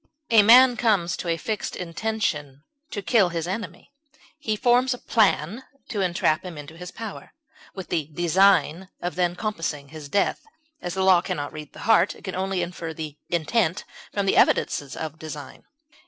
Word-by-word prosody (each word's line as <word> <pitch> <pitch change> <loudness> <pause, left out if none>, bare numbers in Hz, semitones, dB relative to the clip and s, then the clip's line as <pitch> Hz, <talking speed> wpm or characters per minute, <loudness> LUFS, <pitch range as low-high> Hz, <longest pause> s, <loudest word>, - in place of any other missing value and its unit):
A 225 -2 +8
man 245 +3 +7
comes 195 -7 +2
to - - -6
a 165 -1 +1
fixed 215 +5 -3
intention 165 -6 -3 0.3
to 205 - -5
kill 200 -3 +3
his 165 -1 -3
enemy; 190 +3 -6 0.5
he 220 -7 -1
forms 245 +3 +3
a - - -11
plan 215 - +1 0.3
to 205 - -2
entrap 175 -2 +1
him 180 -4 -8
into 145 +2 -9
his 180 +1 -8
power, 225 0 -8 0.4
with 190 -2 -7
the 160 -4 -1
design 175 +2 +2
of 175 - -3
then 175 -1 0
compassing 165 -8 -4
his 155 -2 -9
death; 200 +4 +1 0.4
as 175 - -4
the 190 - 0
law 185 -2 +6
can - - -3
not 145 0 -5
read 150 -2 -9
the - - -11
heart, 205 -4 +4
it - - -17
can 190 - -5
only 190 -1 -1
infer 170 -2 -6
the 155 -2 -7
intent 175 +2 0 0.3
from 200 -1 -1
the 195 - +2
evidences 140 -2 +2
of 160 0 -6
design. 150 -3 -9
180 Hz, 180 wpm, -24 LUFS, 160-210 Hz, 0.5 s, A